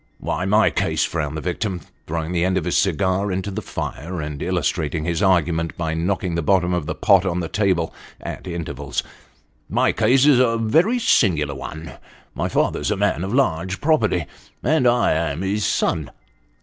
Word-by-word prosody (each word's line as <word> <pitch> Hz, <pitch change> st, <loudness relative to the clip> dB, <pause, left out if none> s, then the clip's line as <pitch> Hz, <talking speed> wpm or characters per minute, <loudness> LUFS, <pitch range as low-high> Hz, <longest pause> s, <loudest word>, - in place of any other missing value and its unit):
" -, -, -40 dB
Why, 90 Hz, +3 st, -1 dB
my 105 Hz, +3 st, +4 dB
case," -, -, 0 dB
frowned 80 Hz, -2 st, -3 dB
the -, -, -4 dB
victim, 90 Hz, +2 st, -2 dB, 0.3 s
throwing 80 Hz, +1 st, -3 dB
the 85 Hz, -1 st, +1 dB
end 95 Hz, +1 st, +1 dB
of 85 Hz, -, -2 dB
his 90 Hz, -, 0 dB
cigar 95 Hz, +2 st, +1 dB
into 95 Hz, +2 st, -3 dB
the 105 Hz, +3 st, -4 dB
fire, 85 Hz, -2 st, -5 dB
and 75 Hz, -2 st, -5 dB
illustrating 80 Hz, -3 st, -1 dB
his 85 Hz, +1 st, -1 dB
argument 85 Hz, -4 st, +1 dB
by 80 Hz, -2 st, -2 dB
knocking 90 Hz, +2 st, -1 dB
the 85 Hz, -, 0 dB
bottom 90 Hz, +2 st, +2 dB
of 85 Hz, -4 st, -2 dB
the -, -, -3 dB
pot 100 Hz, -4 st, +4 dB
on 90 Hz, -2 st, -1 dB
the 85 Hz, -, -2 dB
table, 90 Hz, -3 st, 0 dB, 0.3 s
at -, -, -7 dB
intervals, 75 Hz, -6 st, -4 dB, 0.4 s
" -, -, -40 dB
my -, -, +4 dB
case 125 Hz, +5 st, +3 dB
is 145 Hz, -4 st, +6 dB
a 115 Hz, -2 st, +3 dB
very 160 Hz, -, +2 dB
singular 85 Hz, -, +2 dB
one. 80 Hz, +4 st, -8 dB, 0.3 s
My -, -, -2 dB
father's -, -, 0 dB
a -, -, 0 dB
man 85 Hz, -, 0 dB
of 95 Hz, -, -3 dB
large 95 Hz, -8 st, 0 dB
property, 110 Hz, -, +2 dB, 0.4 s
and 150 Hz, -1 st, +3 dB
I 120 Hz, 0 st, +3 dB
am 80 Hz, +1 st, -1 dB
his 100 Hz, +2 st, 0 dB
son." -, -, 0 dB
90 Hz, 190 wpm, -21 LUFS, 80-105 Hz, 0.4 s, is